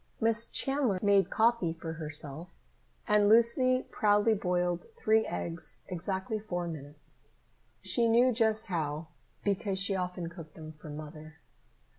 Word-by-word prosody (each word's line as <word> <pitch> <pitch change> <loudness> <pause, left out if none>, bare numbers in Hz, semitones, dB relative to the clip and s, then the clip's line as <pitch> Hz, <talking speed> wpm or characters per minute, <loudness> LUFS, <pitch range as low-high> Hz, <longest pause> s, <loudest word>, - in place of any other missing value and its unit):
Miss 230 0 +2
Chandler 270 -7 +1
made 200 -1 +4
coffee 225 -7 +2
for 165 -1 -7
herself, 155 +1 -3 0.5
and 210 -1 +4
Lucy 255 +3 +4
proudly 210 0 +3
boiled 180 -3 -1
three 220 - +2
eggs 85 +7 -4
exactly 190 +4 -3
four 175 -5 -4
minutes. 145 -2 -9 0.5
She 235 -1 +2
knew 240 +3 +4
just 220 -2 +1
how, 160 -3 -3 0.3
because 200 -1 -1
she 195 +1 +2
often 180 -2 -3
cooked 165 -3 -11
them 155 -1 -9
for 150 0 -13
Mother. 155 +1 -9
185 Hz, 130 wpm, -30 LUFS, 160-220 Hz, 0.5 s, made